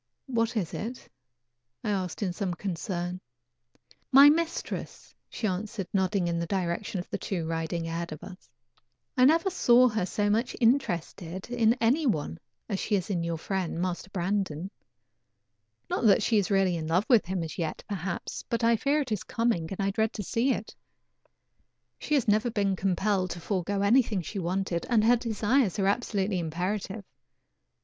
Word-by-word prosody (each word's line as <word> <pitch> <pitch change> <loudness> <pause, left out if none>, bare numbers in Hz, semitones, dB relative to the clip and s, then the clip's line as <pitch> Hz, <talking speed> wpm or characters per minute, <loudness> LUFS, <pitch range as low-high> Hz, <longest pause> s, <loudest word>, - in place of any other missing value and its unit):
"What 230 -2 0
is 185 -6 -2
it?" 240 +4 -5 0.8
I 215 - 0
asked 190 0 -2
in 185 -3 -1
some 180 -1 -2
concern. 180 -1 -4 0.9
"My 280 +2 +9
mistress," 335 +2 -3 0.2
she 230 - -4
answered, 200 +1 -2
nodding 190 -1 +1
in 170 0 -1
the 170 - -2
direction 185 +1 -2
of 175 - -6
the - - -2
two 175 -5 -3
riding 165 +1 -2
ahead 170 +1 -4
of 155 - -8
us. 185 -8 -11 0.7
"I 255 - +5
never 330 +6 +4
saw 250 -7 +5
her 215 -5 -1
so 205 +1 0
much 225 +4 +1
interested 190 - 0
in 235 -1 +3
any 255 +6 +2
one 145 - -1 0.3
as 200 -4 -2
she 210 - 0
is 190 +1 -2
in 175 -3 0
your 170 -1 -2
friend, 180 -1 -3
Master 180 +1 -3
Brandon. 190 -2 -2 1.2
Not - - -1
that 205 - +5
she 220 -3 +3
is 195 - -1
really 195 -3 +3
in 160 -1 -4
love 180 +6 +2
with 235 -8 +4
him 185 -2 -2
as 160 +3 -6
yet 160 -2 -3
perhaps, 185 -3 -4
but 230 0 -1
I 230 0 +4
fear 285 +6 +1
it 260 -5 -5
is 210 -3 0
coming 225 -9 0
and 195 - -6
I 195 0 +1
dread 220 +2 0
to 210 - -4
see 235 +8 +1
it. 220 -3 -3 1.3
She 300 - 0
has 265 -6 +1
never 215 +3 +3
been 200 -4 0
compelled 190 0 0
to 175 +1 -5
forego 195 +2 -1
anything 220 -3 +3
she 200 - -5
wanted, 180 -1 -1
and 230 -3 +4
her 235 +2 +6
desires 230 -1 +1
are 195 - +1
absolutely 200 -2 0
imperative. 190 +5 -3
200 Hz, 175 wpm, -28 LUFS, 175-230 Hz, 1.3 s, My